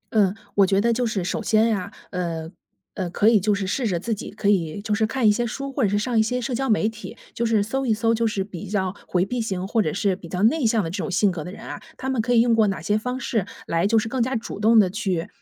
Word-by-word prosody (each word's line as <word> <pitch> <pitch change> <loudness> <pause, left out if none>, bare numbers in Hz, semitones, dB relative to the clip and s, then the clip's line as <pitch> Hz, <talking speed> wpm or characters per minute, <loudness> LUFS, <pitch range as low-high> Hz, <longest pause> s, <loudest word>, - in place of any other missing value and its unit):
嗯， 200 -2 +3 0.2
我 200 -1 +5
觉 195 +1 +2
得 235 +3 +2
就 245 +1 0
是 200 -4 -2
首 180 - -2
先 220 0 +3
啊， 185 -2 -5 0.2
呃， 165 -3 -3 0.4
呃， 185 -3 -3
可 205 +5 +3
以 225 -2 +5
就 205 +2 +1
是 200 -1 -2
试 235 +5 -1
着 175 -4 0
自 225 +6 -2
己， 210 - -6
可 205 - -4
以 180 -4 +1
就 210 +1 -2
是 220 +1 +2
看 245 -1 +1
一 210 - +7
些 240 +3 0
书， 275 +4 -5
或 270 - -1
者 210 - +3
是 205 - +1
上 225 +2 +1
一 - - +6
些 250 +3 0
社 250 +1 -3
交 270 +2 -1
媒 215 0 +3
体， 225 0 -7 0.2
就 235 - -1
是 220 -2 +2
搜 265 +6 -2
一 220 - +3
搜， 225 +1 +1
就 230 0 +1
是 200 -3 -1
比 195 -1 -8
较 190 -2 -1
回 180 0 +1
避 245 +3 -2
型， 190 -4 -3
或 225 +2 +2
者 155 - 0
是 195 0 0
比 185 -3 -11
较 180 +3 -2
内 270 +2 +3
向 220 -2 +2
的 165 - -4
这 185 - -4
种 195 - -3
性 190 +1 +2
格 165 -4 -5
的 180 - -7
人 - - -10
啊， - - -7 0.2
他 265 - -3
们 255 -4 +1
可 245 +2 0
以 230 - +6
用 235 0 +3
过 220 -2 +4
哪 195 - -2
些 205 +6 0
方 250 +4 -2
式， 220 -6 -1 0.2
来 170 +4 +1
就 225 - +3
是 220 0 +1
更 250 +2 -1
加 260 +3 0
主 225 -3 -5
动 225 +2 +5
地 195 -3 +4
去， 190 -5 -2
215 Hz, 325 characters per minute, -23 LUFS, 190-230 Hz, 0.4 s, 一